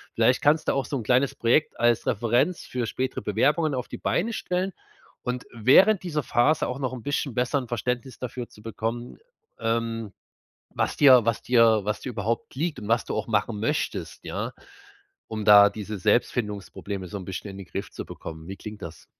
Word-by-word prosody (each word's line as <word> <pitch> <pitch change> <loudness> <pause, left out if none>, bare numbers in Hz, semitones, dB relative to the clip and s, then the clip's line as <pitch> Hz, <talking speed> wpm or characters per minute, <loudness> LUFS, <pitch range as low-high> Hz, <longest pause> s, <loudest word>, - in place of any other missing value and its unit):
Vielleicht 115 +3 +3
kannst 150 +2 +3
du - - +3
auch 135 -1 0
so 140 - -3
'n 120 - -4
kleines 125 +4 +2
Projekt 120 +6 +1
als 120 -1 +3
Referenz 120 - +1
für 125 -3 -3
spätere 130 +3 -3
Bewerbungen 150 0 +1
auf 125 -1 -3
die - - -7
Beine 225 +6 0
stellen. 185 -1 -2 0.5
Und 125 0 -3
während 175 - +5
dieser 155 -5 -2
Phase 125 +7 +2
auch 125 - -4
noch 130 -2 -2
'n 125 -3 -7
bisschen 145 -2 -1
besser 125 +4 +1
'n 125 - -7
Verständnis 125 +2 -3
dafür 125 -1 -5
zu 105 - -17
bekommen, 115 +2 -4 0.4
ähm, 115 -1 -1 0.6
was - - -1
dir 130 -4 +8
was 115 -1 0
dir 115 -3 +5
was 105 +1 -2
dir - - -5
überhaupt 115 +2 -3
liegt 155 +3 -2
und 105 - -8
was 115 0 +2
du - - -3
auch - - -2
machen 110 -1 0
möchtest, 150 +9 -2
ja, - - -4 0.7
um 110 -1 -4
da 105 -1 +9
diese 105 0 -6
Selbstfindungsprobleme 105 -3 -1
so 100 - -6
'n 95 - -8
bisschen 95 +2 -6
in 95 - -10
den 95 -2 -9
Griff - - -5
zu - - -7
bekommen. 80 0 -9
Wie 95 - -6
klingt 105 0 -9
das? 85 0 -9
120 Hz, 195 wpm, -26 LUFS, 105-135 Hz, 0.7 s, da